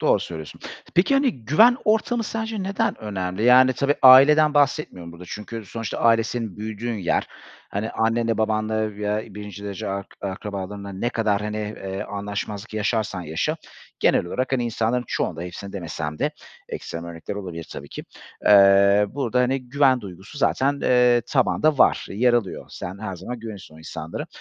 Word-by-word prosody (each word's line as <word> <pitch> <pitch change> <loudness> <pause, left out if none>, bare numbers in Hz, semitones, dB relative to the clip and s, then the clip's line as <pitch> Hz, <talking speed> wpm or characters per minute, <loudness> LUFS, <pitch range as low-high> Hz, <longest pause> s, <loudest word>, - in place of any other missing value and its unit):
Doğru - - +3
söylüyorsun. 80 -3 -8 0.3
Peki, 185 +10 +3
hani, 260 - +1
güven 225 - +5
ortamı 225 +2 +1
sence 220 -2 -3
neden 195 +1 -1
önemli? 95 -2 -4
Yani 130 +1 +7
tabii, 140 +3 +1
aileden 150 +4 +8
bahsetmiyorum 140 - 0
burada 85 +2 -11
çünkü 110 +4 -7
sonuçta 115 -1 -5
aile 115 -1 +4
senin 115 -3 -4
büyüdüğün 110 +2 -4
yer. 85 - 0 0.4
Hani, 105 +3 -3
annenle 115 0 0
babanla 110 -1 0
veya 105 0 -3
1'inci 105 -1 -8
derece 100 -2 -5
ark 100 0 -4
akrabalarınla 100 0 -5
ne 120 +6 -2
kadar, 105 -3 0
hani, 105 0 -4
eee, 100 -2 -5
anlaşmazlık 105 +1 -5
yaşarsan 110 -3 -1
yaşa 80 0 -2 0.4
genel - - +3
olarak, 130 +9 -2
hani, 125 -2 +1
insanların 115 +1 -1
çoğunda, 80 0 -2
hepsinde 100 +3 -8
demesem 80 -4 -5
de - - 0 0.4
ekstrem 85 0 -6
örnekler 85 +3 -7
olabilir 90 -5 -6
tabii 70 - -8
ki, - - -8 0.4
eee, 100 0 +6
burada, 125 -3 -1
hani, 125 0 0
güven 135 -1 +3
duygusu 95 - -10
zaten, 140 0 +1
eee, 125 -1 +4
tabanda 145 +2 +2
var, - - +4
yer 120 +4 +2
alıyor. 115 -6 -1
Sen 90 +2 -7
her 95 -3 -5
zaman 120 +8 -7
güveniyorsun 105 -8 -9
o - - -14
insanlara. 80 0 -6
110 Hz, 160 wpm, -23 LUFS, 100-125 Hz, 0.4 s, aileden